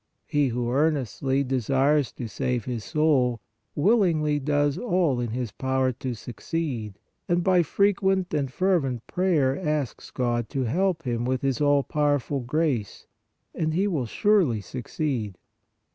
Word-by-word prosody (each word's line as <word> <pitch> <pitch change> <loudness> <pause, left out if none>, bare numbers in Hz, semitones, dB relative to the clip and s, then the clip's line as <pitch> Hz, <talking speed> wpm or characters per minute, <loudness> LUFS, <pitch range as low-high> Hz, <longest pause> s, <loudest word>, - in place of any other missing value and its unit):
He 145 -1 +1
who 120 0 -2
earnestly 135 -2 +1
desires 135 +2 +1
to 120 - -6
save 120 +2 -2
his 120 -4 -4
soul, 130 -4 +2 0.4
willingly 155 -5 +2
does 145 0 +1
all 175 - +1
in 120 -1 -2
his 120 -1 -3
power 130 +1 0
to 125 0 -5
suc 115 0 -10
ceed, 125 -12 -3 0.3
and 175 0 +2
by 185 -1 +4
frequent 190 +1 +1
and 140 -4 -1
fervent 140 - 0
prayer 160 -8 +1
asks 150 -6 -3
God 120 -3 -1
to 135 - -1
help 170 +7 0
him 120 -2 -2
with 130 +1 -1
His 135 -2 0
all 145 -1 +4
powerful 145 -1 0
grace, 130 - -1 0.5
and 155 -1 -1
he 190 +3 +2
will 150 - -1
surely 180 - +2
succeed. 120 - -4
140 Hz, 145 wpm, -25 LUFS, 125-160 Hz, 0.5 s, by